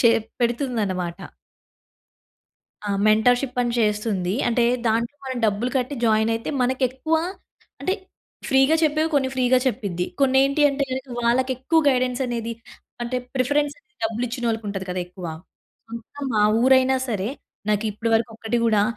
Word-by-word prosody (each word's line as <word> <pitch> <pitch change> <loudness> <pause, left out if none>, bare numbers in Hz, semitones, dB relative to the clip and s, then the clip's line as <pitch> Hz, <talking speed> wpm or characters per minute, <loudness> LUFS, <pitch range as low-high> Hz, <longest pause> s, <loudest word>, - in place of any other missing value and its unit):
చే 235 - +7 0.3
పెడుతుందనమాట. 215 - -1 1.7
ఆ! - - 0 0.2
మెంటర్‍షిప్ 245 +4 +3
అని 240 - -1
చేస్తుంది. 210 -3 0
అంటే 240 0 +2 0.2
దాంట్లో 230 +5 0
మనం 260 -1 -3
డబ్బులు 215 +4 0
కట్టి 260 +2 -1
జాయిన్ 220 0 +3
అయితే, 230 0 -3
మనకు 260 +2 0
ఎక్కువ 265 +6 -2 0.7
అంటే 375 - 0 0.5
ఫ్రీగా 270 +3 +4
చెప్పేవి 310 +1 +2
కొన్ని 270 -2 +2
ఫ్రీగా 255 0 +3
చెప్పిద్ది. 185 -8 -1 0.2
కొన్ని 265 -1 +4
ఏంటి 280 +2 0
అంటేగనక 270 -1 -3
వాళ్ళకి 250 +3 +2
ఎక్కువ 295 +6 +1
గైడెన్స్ 250 -1 +1
అనేది 235 -1 -3 0.5
అంటే 240 +1 -2 0.2
ప్రిఫరెన్స్ 285 +3 +1
అనేది 420 +1 -34
డబ్బులు 225 +2 -1
ఇచ్చిన 245 +1 -5
వాళ్ళకి 225 -1 -2
ఉంటది 195 -1 -4
కదా! 180 0 -2
ఎక్కువ. 180 0 -9 0.6
సొంతం 235 +5 -7
మా 210 - +3 0.2
ఊరైనా 260 0 +5
సరే, 205 -3 -1 0.4
నాకు 210 0 +1
ఇప్పటివరకు 225 +2 0
ఒక్కటి 225 +1 -1
కూడా 215 -2 +3
240 Hz, 140 wpm, -23 LUFS, 220-265 Hz, 1.7 s, చే